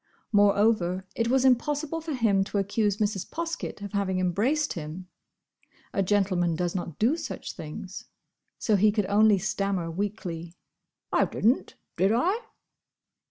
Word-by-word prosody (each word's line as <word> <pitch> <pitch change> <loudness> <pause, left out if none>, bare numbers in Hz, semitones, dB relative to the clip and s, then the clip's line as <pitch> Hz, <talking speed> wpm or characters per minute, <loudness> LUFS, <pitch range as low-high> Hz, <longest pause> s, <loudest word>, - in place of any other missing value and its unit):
Moreover, 205 -3 +3
it 230 - 0
was 260 +2 +3
impossible 295 +5 +1
for 315 -2 -4
him 210 -6 +3
to 205 - -3
accuse 200 +1 +1
Mrs. 205 -3 -1
Poskett 335 -9 -4
of 200 - -6
having 195 -2 0
embraced 230 - +1
him. 165 +3 -7 0.9
A 195 - +1
gentleman 185 -3 +1
does 175 +1 -1
not 175 -5 -4
do 240 +8 +3
such 335 - -6
things. 170 +5 -8 0.5
So 215 -4 +2
he 210 +2 +5
could 210 -1 0
only 205 +1 +5
stammer 190 -3 -1
weakly, 175 -3 -4 0.6
"I - - +4
didn't, 235 +6 0 0.2
did 190 +4 +3
I?" 370 - +1
205 Hz, 140 wpm, -27 LUFS, 185-230 Hz, 0.9 s, he